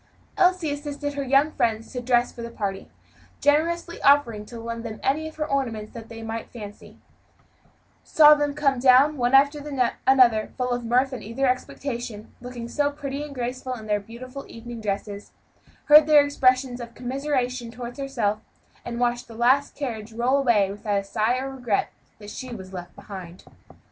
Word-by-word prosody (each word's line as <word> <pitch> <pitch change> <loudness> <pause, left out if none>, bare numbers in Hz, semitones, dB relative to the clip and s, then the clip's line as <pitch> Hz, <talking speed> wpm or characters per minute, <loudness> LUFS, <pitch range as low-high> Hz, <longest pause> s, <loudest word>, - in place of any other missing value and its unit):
Elsie 365 -5 +2
assisted 290 0 -4
her 285 - -3
young 275 +3 +3
friends 225 -4 -1
to 250 - -3
dress 245 0 +2
for 235 - -10
the 235 - -5
party 200 -4 -4 0.5
generously 335 +4 +1
offering 235 -7 +3
to 235 - -9
lend 230 0 -5
them 220 -2 -6
any 305 +4 0
of 315 - -10
her 305 - -2
ornaments 235 -7 -2
that 230 -2 -9
they 225 0 -9
might 225 0 -5
fancy 210 -3 -11 1.1
saw 300 -1 +7
them 290 -1 0
come 275 -4 +1
down, 265 +4 +5
one 245 -1 +2
after 280 +2 +5 0.5
another, 245 -5 +5
full 250 -1 -1
of 245 0 -1
mirth 250 +3 +2
and 255 - -5
eager 230 +6 -2
expectation, 250 -2 -2
and - - -18
looking 245 -1 -7
so 285 +4 0
pretty 285 -1 -5
and 295 -1 -7
graceful 255 +1 -4
in 220 -3 -10
their 210 -1 +1
beautiful 250 +6 -9
evening 235 0 -9
dresses, 205 0 -4 0.5
heard 300 0 +8
their 295 -2 +7
expressions 255 -3 +1
of 235 0 -9
commiseration 255 -2 -2
toward 240 0 -8
herself, 235 -7 -1 0.4
and 235 0 -5
watched 240 0 0
the 230 - -12
last 260 +5 +2
carriage 230 -6 -5
roll 245 +4 +2
away 215 -7 +3
without 205 0 -1
a - - -5
sigh 215 +5 0
or 270 +1 -4
regret 245 -6 -1 0.3
that 205 -1 -10
she 255 - -7
was 190 -5 -9
left 175 -1 -8
behind. 185 -3 -10
245 Hz, 180 wpm, -24 LUFS, 225-280 Hz, 1.1 s, heard